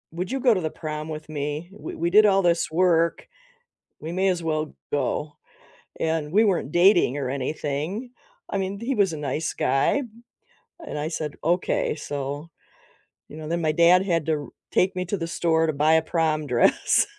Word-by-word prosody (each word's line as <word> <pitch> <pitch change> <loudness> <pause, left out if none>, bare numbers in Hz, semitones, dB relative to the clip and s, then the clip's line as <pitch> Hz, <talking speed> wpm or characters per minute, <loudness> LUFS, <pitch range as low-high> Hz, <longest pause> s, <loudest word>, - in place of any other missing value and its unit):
"Would 180 +6 -4
you 270 - -1
go 245 -3 +5
to 185 - -1
the 160 - -1
prom 155 0 -6
with 155 0 -7
me? 150 +2 -4
We 205 - -8
we 170 +1 -1
did 210 +4 +6
all 195 -1 +4
this 170 -2 +1
work, 170 0 +2 0.7
we 160 - -6
may 190 +2 +1
as 180 -2 0
well 155 -1 -2 0.2
go," 145 +2 -1 0.7
and 160 -2 -1
we 210 +5 +5
weren't 185 -9 0
dating 175 - +4
or 135 -3 -2
anything. 150 - -3 0.4
I - - -2
mean, 195 +1 -3
he 240 +5 -2
was 200 -6 +2
a - - -4
nice 150 +2 -2
guy, 135 - +1 0.8
and 150 - -5
I 150 +1 -2
said, 155 -3 -4
"Okay," 175 +3 +1
so, 145 +1 -5 0.8
you 150 - -10
know, 155 -1 -7
then 170 +2 -1
my 155 -1 +2
dad 170 +4 +5
had 165 -5 0
to 160 - +2
r 145 - -7 0.2
take 185 +1 +2
me 185 0 -2
to 200 +3 -2
the 165 -2 -4
store 165 -1 +1
to 155 - 0
buy 150 +3 +3
a 160 - +5
prom 160 -2 0
dress 120 -2 +3
160 Hz, 190 wpm, -24 LUFS, 150-180 Hz, 0.8 s, did